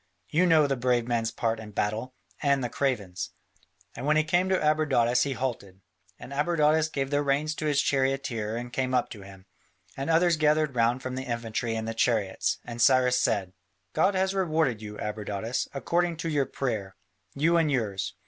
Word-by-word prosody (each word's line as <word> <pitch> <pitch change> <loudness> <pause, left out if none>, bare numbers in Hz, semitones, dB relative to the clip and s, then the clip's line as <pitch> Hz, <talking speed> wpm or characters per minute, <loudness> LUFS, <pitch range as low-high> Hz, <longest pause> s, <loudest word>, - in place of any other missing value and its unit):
You 180 +4 +3
know 160 -3 +5
the 140 -1 0
brave 125 -1 +1
man's 115 -2 0
part 115 0 -2
in 105 -1 -10
battle, 110 +6 -2 0.3
and 140 -2 +2
the 120 - -2
craven's." 105 -11 -2 0.6
And 130 +4 -5
when 155 +1 +4
he 155 - +4
came 180 +3 +1
to 190 - +3
Abradatas, 145 -6 +2
he 140 - -1
halted, 115 -8 -4 0.4
and 140 - -10
Abradatas 155 +1 +2
gave 135 0 -2
the 145 0 +2
reins 145 +2 0
to 155 -1 -3
his 145 -2 +2
charioteer 135 -5 0
and 120 +1 -6
came 130 -1 0
up 125 - 0
to 105 - -9
him, 95 -1 -13 0.5
and 135 +3 -4
others 165 0 +4
gathered 155 -1 +2
round 120 +2 +1
from 130 - -4
the 130 +1 -4
infantry 115 -1 -2
and 110 0 -3
the 115 - -2
chariots, 110 -4 0
and 120 0 -5
Cyrus 125 0 +4
said: 95 -4 0 0.4
"God 195 +1 +2
has 190 +1 +1
rewarded 160 - 0
you, 105 -1 -8
Abradatas, 105 +2 -3
according 170 +4 0
to 165 +1 -3
your 145 -3 +1
prayer, 110 -8 -3 0.4
you 165 +4 +3
and 160 -3 +2
yours. 105 -7 -2
130 Hz, 185 wpm, -27 LUFS, 115-150 Hz, 0.6 s, know